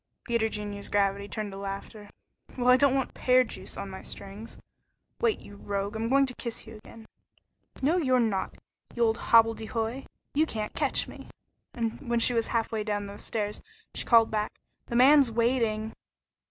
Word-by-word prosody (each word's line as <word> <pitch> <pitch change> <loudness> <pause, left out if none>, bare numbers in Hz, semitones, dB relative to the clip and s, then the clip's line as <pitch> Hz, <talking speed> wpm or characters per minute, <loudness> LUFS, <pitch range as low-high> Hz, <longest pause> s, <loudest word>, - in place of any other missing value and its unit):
Peter 235 -2 +1
Junior's 205 -1 -5
gravity 200 0 +1
turned 210 -1 -4
to 195 - -8
laughter. 200 +1 -7 0.5
"Well, 250 0 +2
I 250 - +9
don't 270 0 +4
want 265 -2 -1
pear 255 0 +4
juice 245 - -8
on 195 - -5
my 190 - -8
strings. 200 +3 -7 0.6
Wait, 455 -2 +2
you 205 - -13
rogue, 200 +1 -3
I'm 225 +1 -2
going 275 +1 +5
to 255 - -5
kiss 235 -2 -5
you 225 - -10
again." 220 +1 -14 0.8
"No, 315 +6 +3
you're 260 -7 +3
not, 210 -5 0 0.4
you 240 - +2
old 225 0 +2
hobble 225 0 +5
de 220 - -8
hoy. 230 +4 -3 0.3
You 310 +2 +3
can't 215 -5 -4
catch - - 0
me." - - -11 0.5
When 235 +1 -2
she 245 - +4
was 230 -1 +1
halfway 225 -2 -1
down 205 -1 -2
the 200 0 -9
stairs, 210 -2 -3 0.3
she - - -2
called 230 -2 +5
back, 215 -1 -2 0.3
"The 235 - -4
man's 270 +1 +7
waiting." 225 -2 0
225 Hz, 180 wpm, -28 LUFS, 210-245 Hz, 0.8 s, I